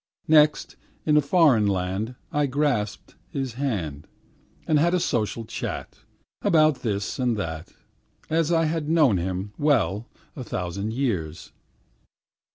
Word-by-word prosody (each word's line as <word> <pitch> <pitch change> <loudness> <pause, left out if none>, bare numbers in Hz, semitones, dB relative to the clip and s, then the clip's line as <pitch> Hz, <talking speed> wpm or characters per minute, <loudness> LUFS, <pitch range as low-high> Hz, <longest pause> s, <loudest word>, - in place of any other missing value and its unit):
Next, 150 -1 +4 0.3
in 150 - +3
a 150 - +6
foreign 140 - +4
land 95 +5 -2 0.2
I 145 -1 +1
grasped 130 -7 -1 0.2
his 135 -3 -3
hand, 95 - -3 0.6
And 155 -2 +3
had 170 +4 +3
a - - +2
social 115 - -1
chat, - - -6 0.4
About 155 -7 +4
this 100 -4 -2
thing 130 - -2
and 120 -3 +1
that, 80 -4 -5 0.5
As 165 +1 +1
I 165 -1 +3
had 155 -1 -2
known 150 - +4
him 95 +3 -3
well 120 -7 +1 0.3
a 130 - -6
thousand 100 +1 -4
years. 95 - -3
125 Hz, 135 wpm, -25 LUFS, 100-150 Hz, 0.6 s, a